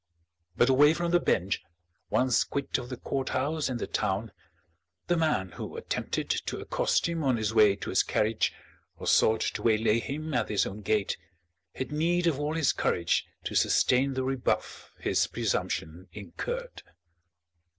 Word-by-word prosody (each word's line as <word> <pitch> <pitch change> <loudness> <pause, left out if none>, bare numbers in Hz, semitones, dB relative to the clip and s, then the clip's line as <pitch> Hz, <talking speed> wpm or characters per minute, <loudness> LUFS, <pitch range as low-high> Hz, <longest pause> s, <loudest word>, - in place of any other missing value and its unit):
But 120 - +5
away 145 +4 +5
from 170 0 -1
the 175 - +5
bench, 95 - 0 0.5
once 125 -2 +3
quit 140 -1 -2
of 125 -1 -8
the 125 - -5
courthouse 140 +4 -1
and 125 -2 -3
the - - -2
town, 105 +1 -2 0.7
the 175 - +1
man 155 - 0
who - - -7
attempted - - -3
to - - -2
accost - - 0
him 165 -2 -2
on 130 -3 +2
his 110 -1 -1
way 105 -3 +6
to - - -6
his - - +4
carriage 110 +1 +1 0.5
or - - -8
sought 110 0 +4
to - - -2
waylay 110 0 +3
him 155 +5 -5
at 120 -3 0
his 105 - +2
own 105 +2 -6
gate, 105 0 0 0.6
had 130 - -4
need 170 +4 +1
of 155 -5 +1
all 150 +2 -1
his 160 -4 +2
courage 85 -1 0 0.2
to - - -4
sustain 130 +2 +3
the 130 - -1
rebuff 130 -1 -2
his - - +1
presumption 85 +4 -2
incurred. 95 -5 -6
125 Hz, 160 wpm, -28 LUFS, 105-150 Hz, 0.7 s, way